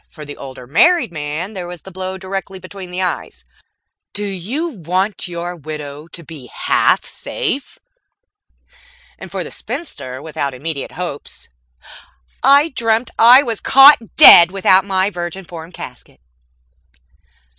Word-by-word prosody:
For 150 -2 -11
the 145 - -9
older 130 -2 -10
married 335 - +3
man, 155 +5 -5
there 180 -3 -6
was 175 -2 -10
a 190 - -10
blow 185 +1 -5
directly 190 0 -6
between 185 0 -10
the 180 +1 -3
eyes: 65 - -5 0.7
"Do 205 0 -4
You 205 - -4
Want 190 - -3
Your 175 0 -6
Widow 150 -1 -8
to 170 0 -12
Be 150 -6 -12
Half - - +1
Safe?" 390 - -4 1.4
And, - - -10
for - - -4
the - - -9
spinster 130 - -7
without 140 -3 -4
immediate 140 +1 -5
hopes, 175 -5 -7 0.9
"_I 280 +3 +4
Dreamt 230 0 0
I 245 +4 +8
Was 230 -5 -4
Caught 270 -4 +6
Dead 170 -1 +9
Without 190 0 +3
My 190 0 0
Virginform 175 -1 -7
Casket! - - -11
185 Hz, 135 wpm, -17 LUFS, 160-210 Hz, 1.4 s, Dead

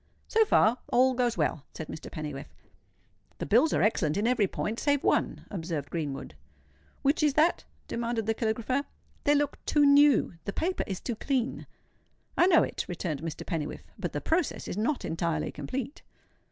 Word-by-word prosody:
"So 445 0 +4
far, 245 - +4
all 255 +2 +4
goes 240 -2 0
well," 140 - 0
said 160 - -6
Mr. 160 - -8
Pennywhiffe. 150 -2 -6 0.9
"The - - -4
bills 320 - +4
are - - +2
excellent 180 -6 +1
in 205 - +1
every 235 -4 +3
point 215 +4 -3
save 285 -2 +1
one," - - +1
observed 165 -7 -4
Greenwood. 150 -5 -4 0.7
"Which 285 +4 +2
is 295 -2 +3
that?" 315 +3 +3 0.2
demanded 230 -1 -2
the 225 - +1
caligrapher. 230 +5 -1 0.4
"They 290 0 +5
look 290 -1 -1
too 295 -1 +3
new—the 280 - +4
paper 365 +9 -1
is 190 -2 -4
too 240 - -3
clean." 260 -1 -1 0.7
"I 350 - +5
know 340 -3 +6
it," - - -3
returned 165 -4 -3
Mr. 165 -1 -5
Pennywhiffe; 160 -5 -4 0.2
"but - - -3
the - - -3
process 325 -1 0
is - - -4
not 235 +8 -1
entirely 165 -1 -1
complete." 250 - -5
230 Hz, 165 wpm, -29 LUFS, -, 0.9 s, know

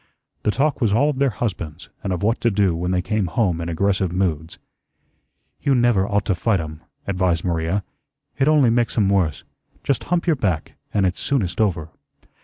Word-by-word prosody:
The - - 0
talk 140 +6 +1
was 110 -4 +2
all 145 +7 +3
of 135 - -6
their 140 -1 +3
husbands 90 -7 -4
and 95 - -2
of 90 +2 -2
what 115 +3 +1
to 120 - +3
do 100 -4 +2
when 90 +2 -2
they 90 -1 0
came 105 -1 0
home 90 -4 0
in 85 - -4
aggressive 95 +1 0
moods. 85 -3 -1 1.0
"You 140 - +2
never 120 -6 +3
ought 105 0 0
to 95 - +2
fight 95 +3 +1
um," 80 -1 -6 0.2
advised 90 -3 0
Maria. 85 +3 0 0.6
"It 135 - +3
only 145 -6 +5
makes 120 0 0
um 100 -3 +3
worse. 90 -7 +1 0.4
Just 140 - 0
hump 175 -1 0
your 165 -3 +3
back, 95 - -1 0.2
and 100 -2 +2
it's 90 0 -1
soonest 110 -9 0
over." 85 -7 0
100 Hz, 195 wpm, -22 LUFS, 85-115 Hz, 1.0 s, only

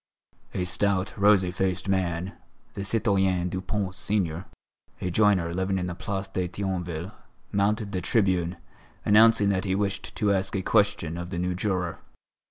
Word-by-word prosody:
A 90 - 0
stout, 95 +1 0
rosy 100 -3 +4
faced 95 +1 -1
man, 90 -1 0 0.4
the 100 - -4
citoyen 95 -4 +1
Dupont 95 +1 -3
senior, 95 -3 -1 0.5
a 90 - -2
joiner 95 -4 +3
living 95 +1 0
in 90 - -1
the 90 - -3
Place 95 +2 -4
de 95 -2 -2
Thionville, 90 -2 -4 0.4
mounted 100 +1 +1
the 90 -2 -2
Tribune, 90 -3 +1 0.5
announcing 105 -1 +6
that 95 -1 +1
he 95 -1 0
wished 100 0 -2
to 105 -2 +2
ask 95 0 -1
a 95 - -1
question 85 -5 +1
of 85 0 -6
the 90 - -4
new 90 +1 0
juror. 90 -2 -2
95 Hz, 155 wpm, -26 LUFS, 90-100 Hz, 0.5 s, announcing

